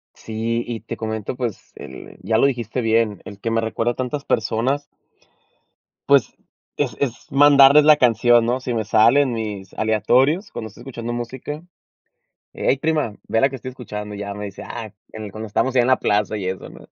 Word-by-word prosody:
Sí, 115 Hz, +1 st, -3 dB
y 115 Hz, -2 st, -4 dB
te 115 Hz, -, -6 dB
comento, 110 Hz, +1 st, -4 dB
pues, 120 Hz, -5 st, -5 dB
el 65 Hz, -, -11 dB
ya 110 Hz, -1 st, +1 dB
lo 135 Hz, -, +4 dB
dijiste 125 Hz, -1 st, -3 dB
bien, 110 Hz, -3 st, +1 dB
el 100 Hz, 0 st, -10 dB
que 115 Hz, -, -2 dB
me 115 Hz, -, +1 dB
recuerda 115 Hz, +1 st, -1 dB
a -, -, -22 dB
tantas 130 Hz, +3 st, -3 dB
personas. 125 Hz, +6 st, 0 dB, 1.2 s
Pues, 140 Hz, -6 st, +3 dB, 0.4 s
es -, -, -1 dB
es 120 Hz, -5 st, -3 dB
mandarles 140 Hz, +1 st, +7 dB
la 150 Hz, -1 st, +7 dB
canción, 120 Hz, -1 st, +4 dB
¿no? 125 Hz, +2 st, 0 dB
Si 125 Hz, -2 st, -3 dB
me 110 Hz, -, 0 dB
sale 115 Hz, +6 st, +5 dB
en 130 Hz, -4 st, 0 dB
mis 105 Hz, -4 st, -5 dB
aleatorios 125 Hz, -, +2 dB
cuando 110 Hz, -, -6 dB
estoy 105 Hz, -, -15 dB
escuchando 120 Hz, -3 st, -6 dB
música. 130 Hz, +6 st, -6 dB, 0.9 s
"Ey, 135 Hz, -, +1 dB
prima, 155 Hz, -8 st, 0 dB
ve 115 Hz, -, +1 dB
la 135 Hz, -, +4 dB
que 135 Hz, -, -7 dB
estoy 130 Hz, -, -7 dB
escuchando", 105 Hz, -5 st, -7 dB
ya, 100 Hz, 0 st, -5 dB
me 105 Hz, 0 st, -6 dB
dice: 100 Hz, -, -8 dB
"Ah, 110 Hz, -3 st, -7 dB, 0.2 s
en 110 Hz, -, -8 dB
el 100 Hz, -, -8 dB
cuando 110 Hz, +2 st, -7 dB
estábamos 130 Hz, +5 st, 0 dB
allá 125 Hz, -, +5 dB
en -, -, 0 dB
la 130 Hz, -, +4 dB
plaza 105 Hz, +1 st, 0 dB
y 95 Hz, -, -5 dB
eso, 95 Hz, 0 st, -4 dB
¿no?" -, -, -14 dB
115 Hz, 200 wpm, -21 LUFS, 110-130 Hz, 1.2 s, mandarles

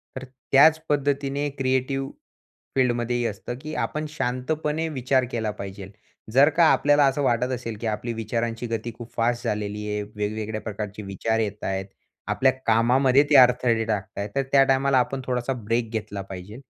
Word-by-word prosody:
तर 130 Hz, -, -6 dB
त्याच 135 Hz, +4 st, +4 dB
पद्धतीने 145 Hz, 0 st, 0 dB
क्रिएटिव्ह 135 Hz, +1 st, 0 dB, 0.6 s
फील्डमध्ये 120 Hz, -2 st, +1 dB
ही 120 Hz, -, -1 dB
असतं, 115 Hz, +3 st, -4 dB
की 155 Hz, +1 st, -7 dB
आपण 155 Hz, 0 st, -2 dB
शांतपणे 150 Hz, +3 st, -2 dB
विचार 130 Hz, -2 st, +1 dB
केला 110 Hz, -2 st, -1 dB
पाहिजेल. 100 Hz, -1 st, -8 dB, 0.4 s
जर 140 Hz, +4 st, +6 dB
का 170 Hz, -, +7 dB
आपल्याला 145 Hz, 0 st, +4 dB
असं 135 Hz, +2 st, 0 dB
वाटत 125 Hz, 0 st, +1 dB
असेल, 115 Hz, -3 st, -5 dB
की 115 Hz, -, -2 dB
आपली 110 Hz, +2 st, -3 dB
विचारांची 115 Hz, +1 st, -3 dB
गती 115 Hz, +1 st, -3 dB
खूप 120 Hz, -1 st, -10 dB
फास्ट 120 Hz, +1 st, 0 dB
झालेली 105 Hz, 0 st, -3 dB
आहे, 105 Hz, 0 st, -2 dB
वेगवेगळ्या 110 Hz, +1 st, -3 dB
प्रकारचे 105 Hz, 0 st, -6 dB
विचार 100 Hz, +3 st, -1 dB
येत 105 Hz, -1 st, -3 dB
आहेत 95 Hz, 0 st, -2 dB
आणि 95 Hz, -, -28 dB, 0.3 s
आपल्या 130 Hz, 0 st, +3 dB
कामामध्ये 125 Hz, +4 st, +4 dB
ते -, -, +4 dB
अडथळे 125 Hz, -2 st, +5 dB
टाकत 105 Hz, -3 st, -3 dB
आहेत, 100 Hz, +1 st, -3 dB
तर 140 Hz, -, +2 dB
त्या 135 Hz, -1 st, +6 dB
टायमाला 135 Hz, 0 st, +2 dB
आपण 135 Hz, +2 st, -1 dB
थोडासा 125 Hz, +1 st, -1 dB
ब्रेक 115 Hz, +2 st, 0 dB
घेतला 105 Hz, -2 st, -4 dB
पाहिजे. 95 Hz, +2 st, -9 dB
120 Hz, 170 wpm, -24 LUFS, 110-135 Hz, 0.6 s, का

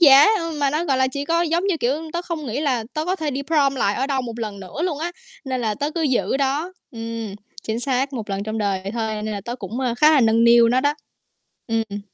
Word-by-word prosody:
giá, 280 Hz, -3 st, +9 dB
ơ, 330 Hz, -1 st, -3 dB
mà 280 Hz, -, +3 dB
nó, 305 Hz, +4 st, 0 dB
gọi 275 Hz, -6 st, +1 dB
là, 260 Hz, -, +3 dB
chỉ 280 Hz, +2 st, -4 dB
có 335 Hz, +3 st, +2 dB
giống 340 Hz, +3 st, +1 dB
như, 385 Hz, -4 st, +1 dB
kiểu, 305 Hz, +4 st, -1 dB
tớ 345 Hz, -, -2 dB
không 335 Hz, -5 st, -5 dB
nghĩ 245 Hz, +5 st, -2 dB
là 255 Hz, -7 st, 0 dB
tớ 310 Hz, -, -1 dB
có 365 Hz, +3 st, 0 dB
thể 310 Hz, -4 st, -2 dB
đi 275 Hz, +1 st, -3 dB
prom 280 Hz, -2 st, +2 dB
lại 205 Hz, -6 st, +1 dB
ở 265 Hz, -, -1 dB
đâu 275 Hz, -2 st, 0 dB
một 235 Hz, -1 st, -6 dB
lần 210 Hz, -3 st, -5 dB
nữa 190 Hz, -, -6 dB
luôn 340 Hz, -5 st, -1 dB
á, 340 Hz, +3 st, -3 dB, 0.3 s
nên 260 Hz, -2 st, -2 dB
là 220 Hz, -2 st, 0 dB
tớ 290 Hz, +7 st, -2 dB
cứ 330 Hz, +1 st, -2 dB
giữ 265 Hz, -2 st, +1 dB
đó 280 Hz, +6 st, -1 dB, 0.2 s
ừm, 230 Hz, -3 st, -5 dB, 0.3 s
chính 220 Hz, +1 st, -2 dB
xác, 270 Hz, +1 st, +1 dB
1 225 Hz, -5 st, -5 dB
lần 195 Hz, 0 st, -2 dB
trong 220 Hz, +1 st, -3 dB
đời 200 Hz, -3 st, 0 dB
vậy 195 Hz, +1 st, -5 dB
thôi 220 Hz, -2 st, -2 dB
nên 215 Hz, 0 st, -3 dB
là 205 Hz, -, -4 dB
tớ 240 Hz, +1 st, -4 dB
cũng, 225 Hz, +2 st, -5 dB
a, 250 Hz, -3 st, 0 dB
khá 300 Hz, +6 st, +5 dB
là 295 Hz, -, +5 dB
nâng 225 Hz, 0 st, +4 dB
niu 235 Hz, 0 st, +7 dB
nó 250 Hz, +2 st, +3 dB
đó. 290 Hz, +2 st, +1 dB, 0.7 s
Ưm, 225 Hz, -1 st, +1 dB
ừm. 205 Hz, 0 st, -5 dB
260 Hz, 275 wpm, -22 LUFS, 225-300 Hz, 0.7 s, giá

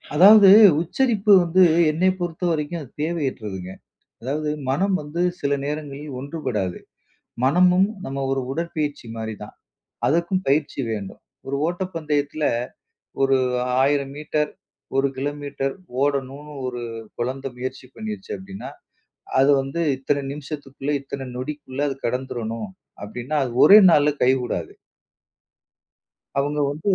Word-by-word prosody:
அதாவது, 200 Hz, +4 st, +9 dB, 0.3 s
உச்சரிப்பு 210 Hz, +2 st, +1 dB
வந்து 180 Hz, +2 st, +4 dB, 0.3 s
என்னைப் 185 Hz, +4 st, +1 dB
பொறுத்தவரைக்கும் 170 Hz, -2 st, -2 dB
அது 130 Hz, -, -11 dB
தேவையற்றதுங்க. 120 Hz, -, -3 dB, 0.5 s
அதாவது, 150 Hz, +4 st, -2 dB, 0.2 s
மனம் 190 Hz, +8 st, +1 dB
வந்து 150 Hz, +4 st, -5 dB, 0.2 s
சில 140 Hz, 0 st, 0 dB
நேரங்களில் 145 Hz, -1 st, -5 dB
ஒன்றுபடாது. 125 Hz, -, -3 dB, 0.7 s
மனமும் 180 Hz, +7 st, +4 dB, 0.2 s
நம்ம 135 Hz, +1 st, -4 dB
ஒரு 135 Hz, -, 0 dB
உடற்பயிற்சி 150 Hz, -4 st, -3 dB
மாதிரிதான். 110 Hz, -2 st, -7 dB, 0.5 s
அதற்கும் 170 Hz, +4 st, +1 dB
பயிற்சி 145 Hz, 0 st, +1 dB
வேண்டும். 105 Hz, -3 st, -5 dB, 0.3 s
ஒரு 140 Hz, +1 st, -2 dB
ஓட்டப்பந்தயத்துல, 155 Hz, -4 st, -2 dB, 0.8 s
ஒரு 135 Hz, 0 st, +4 dB, 0.5 s
1,000 140 Hz, 0 st, +1 dB
மீட்டர், 150 Hz, 0 st, -1 dB, 0.5 s
1 135 Hz, +1 st, +3 dB
கிலோமீட்டர் 140 Hz, 0 st, -3 dB, 0.3 s
ஓடணுன்னு 140 Hz, +1 st, -2 dB
ஒரு 125 Hz, -1 st, -4 dB, 0.4 s
கொழந்த 130 Hz, +3 st, -3 dB
முயற்சி 130 Hz, +1 st, -6 dB
பண்ணிருச்சு 215 Hz, -3 st, -7 dB
அப்டின்னா, 195 Hz, +1 st, -9 dB, 0.7 s
அது 135 Hz, +2 st, +5 dB
வந்து 135 Hz, +5 st, -5 dB, 0.2 s
இத்தன 140 Hz, +1 st, -1 dB
நிமிஷத்துக்குள்ள 145 Hz, -1 st, -6 dB
இத்தன 135 Hz, -1 st, -6 dB
நொடிக்குள்ள 140 Hz, 0 st, -5 dB
அது 135 Hz, -, -5 dB
கடந்துரணும் 115 Hz, -4 st, -3 dB, 0.4 s
அப்டின்னா, 125 Hz, +7 st, -5 dB
அது 120 Hz, -, -5 dB
ஒரே 205 Hz, +2 st, +10 dB
நாள்ல 150 Hz, -2 st, +4 dB
கை 130 Hz, -, +5 dB
கூடாது. -, -, -4 dB, 1.6 s
அவுங்க 145 Hz, +2 st, 0 dB
வந்து 150 Hz, +2 st, -6 dB
145 Hz, 110 wpm, -23 LUFS, 135-165 Hz, 1.6 s, ஒரே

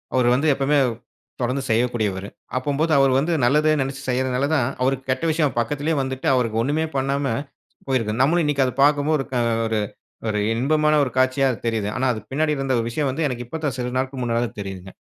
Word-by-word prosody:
அவரு 125 Hz, -2 st, +3 dB
வந்து 140 Hz, +5 st, +1 dB
எப்பமே 140 Hz, +2 st, +1 dB, 0.6 s
தொடர்ந்து 125 Hz, +3 st, 0 dB
செய்யக்கூடியவரு. 110 Hz, -4 st, 0 dB, 0.3 s
அப்போம்போது 145 Hz, +5 st, 0 dB
அவர் 135 Hz, -1 st, +4 dB
வந்து 165 Hz, +5 st, 0 dB
நல்லதே 150 Hz, +5 st, +3 dB
நெனைச்சு 135 Hz, +1 st, -4 dB
செய்றதனால 130 Hz, +1 st, 0 dB
தான், 130 Hz, -6 st, +2 dB
அவருக்கு 130 Hz, 0 st, 0 dB
கெட்ட 130 Hz, +3 st, 0 dB
விஷயம் 155 Hz, -3 st, 0 dB
பக்கத்திலேயே 145 Hz, +7 st, -1 dB
வந்துட்டு, 130 Hz, 0 st, -3 dB
அவருக்கு 115 Hz, -3 st, 0 dB
ஒண்ணுமே 150 Hz, +5 st, 0 dB
பண்ணாம 140 Hz, +1 st, 0 dB, 0.6 s
போயிருக்கு. 115 Hz, -4 st, 0 dB
நம்மளும் 165 Hz, +6 st, +3 dB
இன்னைக்கு 140 Hz, -2 st, +2 dB
அத 125 Hz, -, -2 dB
பார்க்கும்போது 145 Hz, 0 st, +3 dB, 0.2 s
ஆ -, -, +2 dB, 0.3 s
ஒரு 110 Hz, -1 st, 0 dB, 0.5 s
ஒரு 105 Hz, -1 st, 0 dB
இன்பமான 150 Hz, +5 st, +2 dB
ஒரு 125 Hz, -, -2 dB
காட்சியா 130 Hz, +1 st, +3 dB, 0.2 s
தெரியிது. 110 Hz, -3 st, 0 dB
ஆனா 130 Hz, -, 0 dB
அது 110 Hz, -, -5 dB
பின்னாடி 150 Hz, +2 st, +1 dB
இருந்த 135 Hz, -1 st, 0 dB
ஒரு 115 Hz, -, -1 dB
விஷயம் 140 Hz, +4 st, -1 dB
வந்து 155 Hz, +4 st, -1 dB
எனக்கு 125 Hz, -2 st, -4 dB
இப்ப 160 Hz, +6 st, -5 dB
தான் 140 Hz, -, -1 dB
சில 125 Hz, -1 st, -3 dB
நாட்கள் 130 Hz, 0 st, -2 dB
முன்னாடி 120 Hz, 0 st, 0 dB
தான் 120 Hz, -2 st, -9 dB
தெரியுதுங்க. 95 Hz, -1 st, -7 dB
130 Hz, 185 wpm, -22 LUFS, 120-145 Hz, 0.6 s, அவர்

